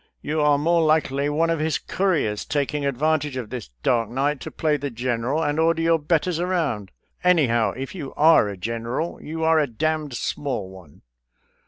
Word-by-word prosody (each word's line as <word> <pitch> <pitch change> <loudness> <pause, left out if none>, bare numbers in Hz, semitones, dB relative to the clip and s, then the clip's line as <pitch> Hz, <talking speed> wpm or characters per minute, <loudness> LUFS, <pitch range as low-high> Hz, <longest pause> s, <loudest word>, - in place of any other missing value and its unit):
You 155 +1 -1
are 150 -1 +4
more 165 +3 +2
likely 150 -3 +2
one 165 +3 +1
of 165 - 0
his 155 0 0
couriers, 160 - -1
taking 145 0 -1
advantage 145 +1 0
of 120 -4 -6
this 125 -3 -5 0.2
dark 115 -3 +2
night 140 +3 0
to - - -7
play 155 -2 0
the 140 0 -3
general 125 +5 -1
and 145 +1 0
order 165 0 +2
your 165 0 +3
betters 165 +2 0
around. 160 - -1 0.3
Anyhow, 120 - +3
if 135 0 -5
you 155 -8 -6
are 155 -8 +5
a 100 - -6
general, 115 - -3
you 160 +1 -5
are 160 0 +4
a 150 - +2
d 120 - -19 0.3
d 130 - -8
small 115 -8 -3
one." 90 -6 -15
145 Hz, 185 wpm, -23 LUFS, 120-160 Hz, 0.3 s, are